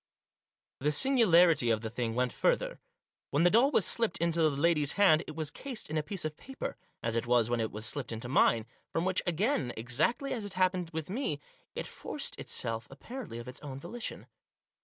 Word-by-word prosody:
The 150 +3 +1
singularity 175 - +5
of 110 -1 +2
the 110 - -4
thing 115 -1 -2
went 125 -1 0
further. - - +1 0.5
When 145 +4 +2
the 175 - +5
doll 240 +6 +5
was 235 -9 +3
slipped 230 -6 +2
into 170 0 +1
the 155 - +5
lady's 150 0 +2
hand 175 -6 +5
it 155 - -7
was 155 -2 -2
cased 255 - -7
in 155 - 0
a - - +1
piece 170 +3 -4
of 155 -1 -4
paper, 270 0 -6 0.3
as 115 0 0
it 115 0 -1
was 120 -1 +3
when 120 - +1
it 110 -1 -1
was 105 +1 -4
slipped 130 +3 -2
into 115 +2 -5
mine, 115 -3 +3 0.3
from, 165 - 0
which, 185 0 +1
again 175 - +1
exactly 145 - 0
as 240 - -3
had 205 -2 -6
happened 185 -2 +1
with 160 +1 -5
me, 205 - -1 0.4
it - - -3
forced - - -4
itself 115 0 -3
apparently 215 - -8
of 120 +1 -8
its 125 - -6
own 135 -2 -7
volition. 225 +10 -6
155 Hz, 200 wpm, -31 LUFS, 120-190 Hz, 0.5 s, singularity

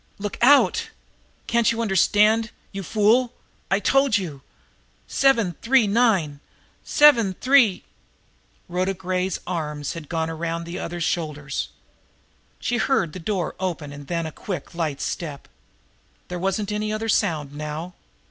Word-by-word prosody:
"Look 205 0 -5
out! 280 +4 +5 0.6
Can't 235 -1 +2
you 230 - -3
understand, 215 +2 +3 0.2
you 195 - -5
fool! 225 +6 +2 0.4
I've 195 +1 +1
told 270 -3 +3
you! 160 -8 -6 0.7
Seven 235 -10 +2
three 255 -1 +4
nine! 200 -10 +2 0.4
Seven 235 -10 +5
three..." 255 -7 +4 0.8
Rhoda 185 +2 -1
Gray's 185 0 -2
arms 150 -5 -3
had 160 -4 -9
gone 160 -1 -1
around 165 +1 -3
the 170 +1 -6
other's 175 0 -4
shoulders. 150 -4 -2 0.9
She 240 - -1
heard 220 - +1
the 185 - -7
door 180 -1 -2
open 165 -6 -3
and 145 -1 -10
then 170 -1 -2
a 160 - -5
quick, 185 +3 -6
light 160 -5 -2
step. 150 -5 -5 0.8
There 180 0 -4
wasn't 195 +3 -1
any 210 0 -2
other 215 +1 -3
sound 160 -10 0
now. 150 +4 -5
185 Hz, 135 wpm, -23 LUFS, 165-220 Hz, 0.9 s, out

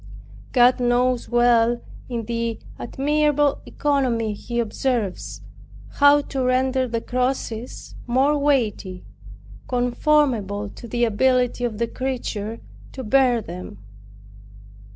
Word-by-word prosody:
God 250 0 +5
knows 245 0 +1
well, 240 -1 +3 0.3
in 235 -3 -3
the 230 0 -2 0.2
admirable 295 +2 +1
economy 250 -7 0
he 235 +3 -4
observes, 230 -3 -2 0.5
how 285 0 +5
to 270 -2 -3
render 255 +1 +1
the 230 -1 -2
crosses 250 -2 -3
more 265 +5 +3
weighty, 230 -10 0 0.6
conformable 245 -5 +1
to 235 - -11
the 240 +1 -1
ability 245 +2 +2
of 230 -3 -2
the 235 - +1
creature 230 -4 -4 0.3
to 260 - -6
bear 245 -1 +3
them. 175 - -8
245 Hz, 105 wpm, -22 LUFS, 230-265 Hz, 0.6 s, God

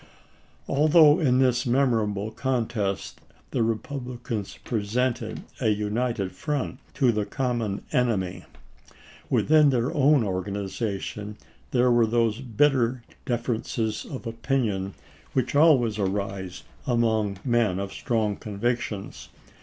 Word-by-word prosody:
Although 150 +1 +5
in 130 -6 +3
this 125 -1 +2
memorable 110 -5 +1
contest 115 -5 -2 0.3
the - - 0
Re 115 -1 +2
publicans 120 -4 -6
presented 120 +3 -1 0.2
a - - 0
united 105 -1 -1
front 145 -3 -3 0.2
to 130 -4 +4
the 105 -2 0
common 115 -3 -2
enemy, 95 - 0 0.8
within 150 -1 +5
their 125 -1 0
own 145 -2 +4
organization 100 +2 -3 0.3
there 125 0 +3
were 120 -1 +4
those 115 -1 +1
bitter 125 -1 +2 0.2
differences 115 -2 -2
of 130 -2 -8
opinion 115 - -1 0.4
which 130 -2 0
always 130 -9 +4
arise 95 -2 -3 0.2
among 110 -5 +1
men 120 -7 +2
of 100 0 -4
strong 110 -4 0
convictions. 105 -1 -3
115 Hz, 105 wpm, -26 LUFS, 105-125 Hz, 0.8 s, Although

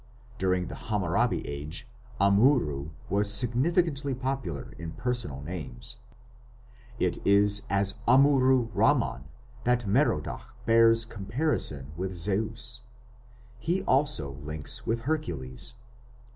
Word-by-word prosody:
During 90 -1 +1
the - - -7 0.2
Hammurabi 105 +3 0
Age 75 - -6 0.3
Amurru 100 - +3 0.2
was 105 +1 +2
significantly 140 - +1
popular 135 +1 -4
in 80 -1 -6
personal 115 - -3
names. 65 -7 -7 1.0
It 90 -5 0
is 100 +1 +4
as 100 +1 +1
Amurru 130 -2 +5
Ramman 65 - +2 0.4
that 125 -1 +1
Merodach 75 - 0
bears 115 0 +5
comparison 100 - -1
with 95 +1 -3
Zeus. 105 +6 -1 0.8
He 175 +9 -1
also 135 - +2
links 75 +1 -3
with 115 +1 0
Hercules. 115 - -3
105 Hz, 100 wpm, -28 LUFS, 80-130 Hz, 1.0 s, Amurru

